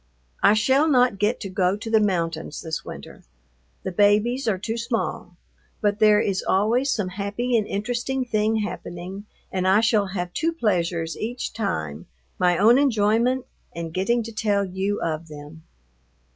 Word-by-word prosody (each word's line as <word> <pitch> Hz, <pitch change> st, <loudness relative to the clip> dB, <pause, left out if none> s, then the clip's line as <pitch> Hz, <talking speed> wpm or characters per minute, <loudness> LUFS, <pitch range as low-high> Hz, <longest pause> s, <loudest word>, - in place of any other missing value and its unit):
I 205 Hz, -, +6 dB
shall 265 Hz, +8 st, +3 dB
not 250 Hz, -7 st, +3 dB
get 210 Hz, +4 st, +1 dB
to 200 Hz, -, -4 dB
go 185 Hz, +1 st, +1 dB
to 225 Hz, +2 st, -7 dB
the 220 Hz, -, +5 dB
mountains 165 Hz, -6 st, -1 dB
this 160 Hz, -1 st, -4 dB
winter. -, -, -10 dB, 0.6 s
The -, -, -3 dB
babies 210 Hz, +7 st, +2 dB
are 205 Hz, -4 st, +2 dB
too 220 Hz, +4 st, -4 dB
small, 230 Hz, -6 st, -3 dB, 0.4 s
but 205 Hz, -1 st, 0 dB
there 210 Hz, -1 st, +6 dB
is 195 Hz, -3 st, 0 dB
always 230 Hz, +8 st, +1 dB
some 205 Hz, -4 st, -1 dB
happy 205 Hz, +6 st, -2 dB
and 215 Hz, -3 st, +1 dB
interesting 245 Hz, +5 st, -2 dB
thing 215 Hz, -2 st, +1 dB
happening, 190 Hz, +1 st, -7 dB, 0.2 s
and 185 Hz, -1 st, -1 dB
I 195 Hz, +3 st, +5 dB
shall 215 Hz, -3 st, +2 dB
have 180 Hz, -2 st, -4 dB
two 330 Hz, +1 st, 0 dB
pleasures 170 Hz, -, -1 dB
each 240 Hz, +3 st, -4 dB
time, 80 Hz, -, -3 dB, 0.3 s
my 180 Hz, -1 st, +3 dB
own 230 Hz, +7 st, +6 dB
enjoyment, 240 Hz, 0 st, +2 dB, 0.3 s
and 165 Hz, -1 st, -5 dB
getting 230 Hz, +6 st, +1 dB
to 230 Hz, -, -7 dB
tell 210 Hz, -2 st, 0 dB
you 190 Hz, +2 st, -2 dB
of 160 Hz, 0 st, -3 dB
them. 150 Hz, +1 st, -11 dB
205 Hz, 160 wpm, -24 LUFS, 180-230 Hz, 0.6 s, I